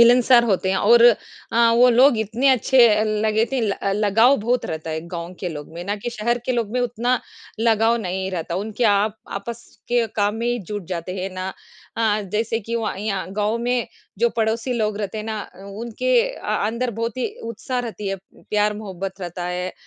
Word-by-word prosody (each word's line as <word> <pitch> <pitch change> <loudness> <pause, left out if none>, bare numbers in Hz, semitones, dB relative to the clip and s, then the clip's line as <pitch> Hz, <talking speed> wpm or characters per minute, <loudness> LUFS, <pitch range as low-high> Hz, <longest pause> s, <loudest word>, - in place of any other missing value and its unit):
मिलनसार 240 +1 +6
होते 190 -4 +1
हैं 190 - +1
और 230 +4 +5 0.5
अ, 230 0 +5
वो 250 +1 +7
लोग 250 0 +5
इतने 225 +5 +1
अच्छे 255 -1 +5 0.3
लगे 220 0 +2
थे, 265 - +1
ल 215 -3 +1 0.3
लगाव 225 +7 +5
बहुत 240 +2 0
रहता 160 0 -5
है 160 0 -2
गाँव 170 +1 -6
के 180 - -2
लोग 150 -3 -7
में 170 - -6
ना 205 +2 -2
कि 215 +4 -5
शहर 235 +1 -1
के 255 - +1
लोग 235 -4 -1
में 250 - 0
उतना 245 +1 0 0.4
लगाव 225 0 +3
नहीं 190 0 -3
रहता, 170 -2 -3
उनके 215 +5 -2
आप 210 0 +3 0.2
आपस 230 +4 -6 0.2
के 240 -1 +2
काम 205 0 +2
में 230 +1 -3
ही 240 0 0
जुट 205 -1 -6
जाते 180 +1 -4
हैं 190 - -3
ना 185 0 -3 0.5
अ, 220 -2 +2
जैसे 220 +3 -1
कि 230 +2 -5
वहाँ 225 -4 -2
यहाँ 195 -2 -3
गाँव 210 +3 0
में 245 0 0 0.3
जो 235 +2 +4
पड़ोसी 225 +2 0
लोग 215 -3 0
रहते 210 0 -4
हैं 215 - -5
ना, 220 -1 -3 0.2
उनके 235 - 0 0.2
अ, - - -11 0.3
अंदर 235 +3 -1
बहुत 230 +1 -3
ही 255 - 0 0.2
उत्साह 230 +3 -4
रहती 225 -4 -4
है, 195 - -2 0.3
प्यार 210 0 +2
मोहब्बत 195 -2 -6
रहता 175 0 -5
है 180 +1 -3
220 Hz, 200 wpm, -22 LUFS, 195-235 Hz, 0.5 s, वो